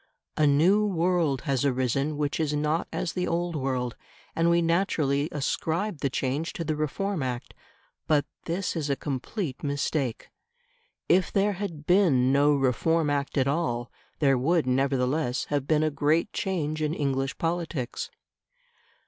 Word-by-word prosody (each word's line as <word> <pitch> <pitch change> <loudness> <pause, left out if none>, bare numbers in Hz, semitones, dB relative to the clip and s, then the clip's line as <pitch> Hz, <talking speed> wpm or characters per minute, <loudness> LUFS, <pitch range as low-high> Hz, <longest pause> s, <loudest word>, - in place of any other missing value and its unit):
A 150 - +3
new 170 +9 +4
world 170 -7 +1
has 135 -4 0
arisen 135 +2 0
which 145 0 -1
is 150 -2 0
not 150 +2 0
as 170 - -2
the 180 -1 -1
old 170 0 -1
world; 130 -4 -2 0.4
and 165 +1 +3
we 170 0 +4
naturally 165 -4 +1
ascribe 160 +5 -1
the 140 - 0
change 135 +5 -2
to 165 - -4
the 155 -1 -1
Reform 165 +5 -2
Act. 125 -2 -4 0.5
But 150 -2 +3 0.2
this 180 +3 -2
is 150 -3 -2
a 140 - +2
complete 140 - -4
mistake. 140 -3 -2 0.8
If 185 +1 +3
there 205 +1 +2
had 175 -6 -5
been 155 -9 +4
no 145 +2 +4
Reform 145 +4 +1
Act 140 0 -1
at 135 -1 +3
all 125 -6 -1 0.3
there 135 -4 +3
would, 165 +4 +2
nevertheless, 130 +1 +1
have 140 -2 0
been 155 -1 +3
a 155 - +1
great 155 +6 +1
change 155 -5 -2
in 155 +1 0
English 135 -2 -1
politics. 165 -6 -2
150 Hz, 150 wpm, -27 LUFS, 135-170 Hz, 0.8 s, new